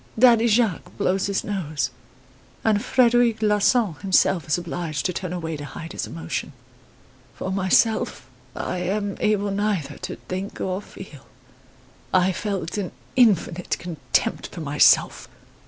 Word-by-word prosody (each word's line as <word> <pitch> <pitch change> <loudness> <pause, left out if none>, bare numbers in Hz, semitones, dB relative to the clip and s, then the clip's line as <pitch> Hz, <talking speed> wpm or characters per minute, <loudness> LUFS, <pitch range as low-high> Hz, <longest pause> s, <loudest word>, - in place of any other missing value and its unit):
Daddy 235 -1 +6
Jacques 220 -4 +1
blows 190 +1 +1
his 200 -1 -1
nose, 155 -10 -2 0.7
and 215 -1 +2
Frederic 240 -3 +3
Larsan 210 -1 +3
himself 190 -3 +2
is 155 - +2
obliged 170 -4 -4
to 180 - 0
turn 180 0 -4
away 165 -3 -3
to 145 - -7
hide 160 +3 -8
his - - -4
emotion. 80 0 -5 0.8
For 190 - -4
myself, 190 - +1 0.3
I 180 - -3
am 200 +2 -2
able 205 -1 +1
neither 195 -8 -1
to - - -5
think 185 +2 -6
or 185 +1 -2
feel. 175 -9 -12 0.8
I 185 0 +3
felt 195 -1 -3
an 190 - -4 0.2
infinite 185 -7 +2
contempt 155 -8 -2
for 170 - -9
myself. 145 -1 +3
190 Hz, 135 wpm, -23 LUFS, 165-210 Hz, 0.8 s, Daddy